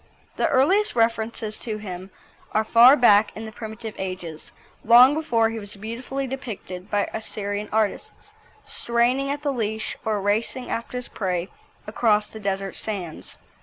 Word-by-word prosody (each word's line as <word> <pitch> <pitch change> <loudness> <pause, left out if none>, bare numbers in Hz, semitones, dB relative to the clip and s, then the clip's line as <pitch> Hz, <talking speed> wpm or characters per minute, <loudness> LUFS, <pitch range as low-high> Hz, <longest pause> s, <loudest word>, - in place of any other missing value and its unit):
The - - +1
earliest 380 +11 +3
references 225 -1 0
to 220 -3 -4
him 190 -3 -7 0.4
are 215 - +2
far 235 +5 +7
back 215 -5 +5
in 220 - -6
the 220 - -7
primitive 220 0 -7
ages, 180 -4 -6 0.3
long 250 +4 +8
before 235 -8 +1
he 225 - -4
was 205 -1 -7
beautifully 235 +6 -5
depicted 215 -8 -7
by 205 -1 +1
Assyrian 210 -1 -4
artists, 215 -1 -2 0.3
straining 245 +4 +1
at 290 +1 -3
the 285 -2 0
leash 220 -2 -2
or 215 -2 0
racing 220 +5 -1
after 230 +2 -3
his 250 - -5
prey 180 -2 -2 0.4
across 215 -1 +2
the 220 - -9
desert 195 -1 -3
sands. 190 -7 -5
220 Hz, 150 wpm, -24 LUFS, 205-240 Hz, 0.4 s, long